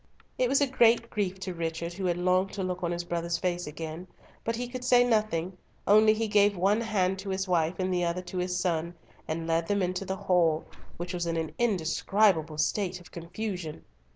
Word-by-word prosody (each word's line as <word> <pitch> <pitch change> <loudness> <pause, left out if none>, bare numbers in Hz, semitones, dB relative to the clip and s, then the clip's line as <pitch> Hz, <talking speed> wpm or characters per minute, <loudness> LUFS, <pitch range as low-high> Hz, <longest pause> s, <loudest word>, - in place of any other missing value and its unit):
It 250 -1 +3
was 275 +2 +3
a - - +5
great 235 -2 +3
grief 195 -3 -2
to 185 -1 -4
Richard, 165 0 -3
who 190 +1 -4
had 175 -1 +1
longed 185 +2 +1
to 195 - -3
look 180 0 -3
on 170 -1 -1
his 175 0 -2
brother's 170 0 -2
face 175 -1 -2
again, 160 +3 -6 0.4
but 230 - -1
he 245 +1 -3
could 250 0 -6
say 245 -1 +5
nothing, 210 -7 0 0.3
only 215 +1 +6
he 225 +1 -1
gave 205 -1 +3
one 200 +5 +2
hand 195 -4 0
to 195 +1 -6
his 190 0 -2
wife 170 -1 +1
and 185 0 -1
the 175 -1 +1
other 170 +1 -1
to 180 +1 -5
his 180 0 -1
son, 170 -1 -1 0.3
and 165 +1 -3
led 165 0 0
them 200 -2 +1
into 180 +1 -1
the 190 0 -3
hall, 175 -5 +2 0.3
which 175 +2 -5
was 175 -1 -2
in 165 0 -1
an 160 -1 -3
indescribable 190 -5 +2
state 185 +2 0
of 180 - -16
confusion. 175 -1 -5
185 Hz, 210 wpm, -28 LUFS, 170-205 Hz, 0.4 s, only